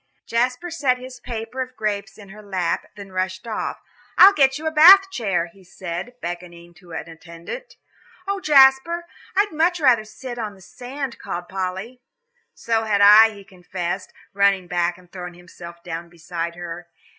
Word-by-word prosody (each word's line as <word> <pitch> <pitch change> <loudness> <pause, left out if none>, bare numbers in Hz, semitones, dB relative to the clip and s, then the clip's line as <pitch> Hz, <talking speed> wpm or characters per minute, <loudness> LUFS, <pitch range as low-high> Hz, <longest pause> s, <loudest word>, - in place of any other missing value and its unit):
Jasper 250 +9 -1
set 275 -6 +1
his 255 0 -10
paper 230 +2 -5
of 255 0 -6
grapes 215 -1 -3
in 205 -2 -13
her 215 +2 -12
lap, 190 -4 -2
then 200 -2 -11
rushed 185 +1 -3
off. 225 -2 -3 0.4
"I'll 390 +2 +9
get 270 -5 +3
you 315 - -9
a 315 - 0
Bath 385 +5 +8
chair," 195 - -1
he 190 +3 -18
said, 180 +6 -7
beckoning 175 0 -7
to 180 - -20
the 160 -1 -6
attendant. 170 - -10 0.5
"Oh, 400 0 -1
Jasper, 295 +2 +5 0.3
I'd 405 +2 +3
so - - -11
much 345 +2 +2
rather 255 -7 +4
sit 240 +3 -8
on 210 -3 -5
the 190 - -19
sand," 255 +5 -7
called 175 0 -6
Polly. 190 +6 -5 0.5
"So 225 -1 -1
had 205 -2 +1
I," 210 +2 +9
he 205 -2 -12
confessed, 185 -1 -5 0.2
running 200 -2 +2
back 175 0 -1
and 180 -1 -20
throwing 180 -2 -8
himself 170 -1 -12
down 170 0 -6
beside 170 0 -5
her. 175 0 -8
205 Hz, 170 wpm, -22 LUFS, 175-255 Hz, 0.5 s, I'll